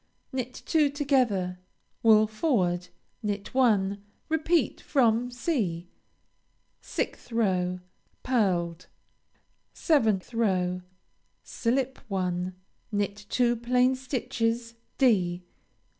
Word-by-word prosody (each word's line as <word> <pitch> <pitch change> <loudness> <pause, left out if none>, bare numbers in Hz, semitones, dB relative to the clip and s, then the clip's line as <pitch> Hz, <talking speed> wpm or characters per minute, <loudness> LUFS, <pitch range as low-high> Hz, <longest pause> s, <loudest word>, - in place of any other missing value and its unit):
Knit 255 -1 -4
two 305 -3 +3
together. 250 -11 +1 0.4
Wool 215 -1 +6
forward. 205 - 0 0.3
Knit 205 -2 -3
one. 205 -6 +2 0.3
Repeat 320 +2 +1
from 245 -3 +2
(c.) 220 - -2 0.9
6th - - -4
row 185 -5 0 0.4
Pearled. 180 -8 0 0.9
7th 225 - +2
row 185 -5 +1 0.6
Slip 260 +2 -1
one. 180 -2 -2 0.4
Knit 205 0 -2
two 240 -1 +2
plain 250 +2 +2
stitches 235 -3 -2 0.2
(_d. 180 -9 +2
225 Hz, 85 wpm, -27 LUFS, 185-255 Hz, 0.9 s, Wool